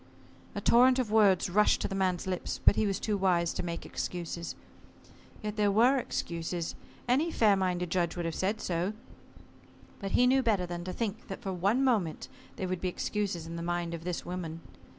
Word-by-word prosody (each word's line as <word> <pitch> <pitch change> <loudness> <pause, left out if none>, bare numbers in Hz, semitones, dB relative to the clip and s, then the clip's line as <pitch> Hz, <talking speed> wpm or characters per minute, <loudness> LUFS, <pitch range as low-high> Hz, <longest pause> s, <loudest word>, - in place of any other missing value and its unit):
A - - -3
torrent 255 +2 +5
of 245 -5 -1
words 200 -5 +4
rushed 210 +4 +3
to - - 0
the - - -5
man's 185 -2 0
lips, 185 -2 -3
but - - +7
he 215 - +1
was 195 -1 -1
too 215 - -1
wise 175 -3 +2
to - - -3
make 170 -1 -5
excuses. 170 -1 -4 0.9
Yet 210 0 -4
there 205 -1 +3
were 240 +7 +4
excuses. 170 -5 -3 0.3
Any 275 +7 +2
fair 215 -7 +4
minded 180 -2 -1
judge 175 -2 0
would 175 -1 -3
have 165 - -2
said 205 +6 -1
so. 180 +3 -1 1.1
But 195 -1 -5
he 250 - +5
knew 265 +1 +4
better 210 -7 +1
than 175 0 -5
to 185 - -3
think 220 +2 -4
that - - -7
for 195 -2 -2
one 200 +9 +1
moment 210 -12 0 0.3
they 190 - -3
would 185 -1 -3
be 185 - 0
excuses 190 -3 -2
in 165 +1 -6
the - - -4
mind 175 0 -2
of 165 -1 -6
this 180 -1 -3
woman. 170 -2 -5
185 Hz, 200 wpm, -30 LUFS, 175-215 Hz, 1.1 s, but